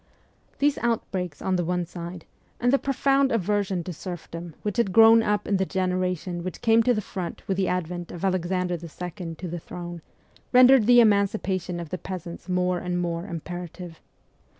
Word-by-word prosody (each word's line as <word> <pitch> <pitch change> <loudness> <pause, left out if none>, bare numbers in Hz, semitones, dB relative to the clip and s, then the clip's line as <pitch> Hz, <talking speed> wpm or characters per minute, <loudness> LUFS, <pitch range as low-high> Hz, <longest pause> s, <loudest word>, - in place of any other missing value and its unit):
These 290 0 +2
outbreaks 185 -9 -2
on 185 -1 +1
the 175 - 0
one 180 +1 -1
side, 170 0 -8 0.3
and 245 +2 +2
the 275 - +4
profound 275 0 +2
aversion 200 -3 0
to 180 - -5
serfdom 170 -1 -7
which 210 -2 -2
had 235 -5 +2
grown 225 +3 +8
up 210 -2 0
in 200 - +2
the 190 - +1
generation 185 -2 -1
which 185 -1 -6
came 225 0 +5
to 245 +2 +3
the 215 - -1
front 185 -3 -6
with 195 - 0
the 190 -1 0
advent 175 -1 -3
of 175 +2 -4
Alexander 180 -1 0
II. 175 +1 -7
to 180 - -6
the 175 +1 -4
throne, 175 0 -8 0.5
rendered 250 -2 +7
the 245 0 +8
emancipation 200 -4 +1
of 170 -3 -6
the 185 - -4
peasants 180 -1 -7
more 180 0 +1
and 180 0 -2
more 170 +1 -2
imperative. 175 -1 -7
180 Hz, 175 wpm, -25 LUFS, 175-210 Hz, 0.5 s, grown